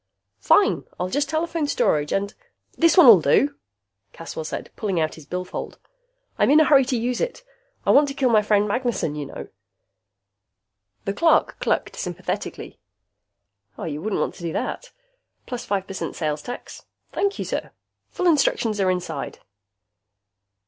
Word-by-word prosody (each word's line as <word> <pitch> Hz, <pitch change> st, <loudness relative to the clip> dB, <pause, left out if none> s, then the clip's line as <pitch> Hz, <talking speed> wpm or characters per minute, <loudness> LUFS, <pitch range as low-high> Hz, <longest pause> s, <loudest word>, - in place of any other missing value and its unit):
"Fine! 405 Hz, -, +3 dB
I'll 180 Hz, +1 st, -1 dB
just 285 Hz, +7 st, 0 dB
telephone 320 Hz, -1 st, -1 dB
Storage 150 Hz, -, +1 dB
and 200 Hz, +1 st, -1 dB, 0.2 s
" -, -, -50 dB
"This 335 Hz, +2 st, +3 dB
one'll 235 Hz, -, +9 dB
do," 280 Hz, -, +3 dB, 0.6 s
Caswell 165 Hz, -1 st, -7 dB
said, -, -, -6 dB
pulling 195 Hz, -5 st, -1 dB
out 155 Hz, -1 st, 0 dB
his 155 Hz, -3 st, -13 dB
billfold. 180 Hz, +2 st, -5 dB, 0.6 s
"I'm -, -, +4 dB
in 300 Hz, +2 st, +7 dB
a -, -, +7 dB
hurry 275 Hz, -2 st, +5 dB
to 255 Hz, -1 st, -1 dB
use 240 Hz, +2 st, -1 dB
it. -, -, -3 dB, 0.4 s
I -, -, +4 dB
want 285 Hz, +1 st, +6 dB
to 275 Hz, -, -5 dB
kill 260 Hz, -4 st, +2 dB
my 215 Hz, -2 st, +5 dB
friend 210 Hz, 0 st, +2 dB
Magnessen, 240 Hz, -, -1 dB
you 150 Hz, -2 st, -5 dB
know." -, -, -9 dB, 1.6 s
The 195 Hz, -, -1 dB
clerk 325 Hz, +10 st, +3 dB
clucked -, -, -1 dB
sympathetically. 175 Hz, -1 st, -5 dB, 1.0 s
"You 150 Hz, -2 st, -5 dB
wouldn't 215 Hz, +2 st, -2 dB
want -, -, -1 dB
to -, -, -14 dB
do 170 Hz, -1 st, -3 dB
that... -, -, -4 dB, 0.5 s
Plus 245 Hz, -2 st, -6 dB
five 195 Hz, -2 st, -1 dB
percent 195 Hz, -1 st, -5 dB
sales 150 Hz, -2 st, -2 dB
tax. 245 Hz, -, -9 dB, 0.3 s
Thank 400 Hz, 0 st, 0 dB
you, -, -, -3 dB
sir. -, -, -3 dB, 0.4 s
Full 365 Hz, -, -3 dB
instructions 235 Hz, -, +2 dB
are 190 Hz, -, +2 dB
inside." 180 Hz, -1 st, -3 dB
215 Hz, 155 wpm, -23 LUFS, 180-285 Hz, 1.6 s, one'll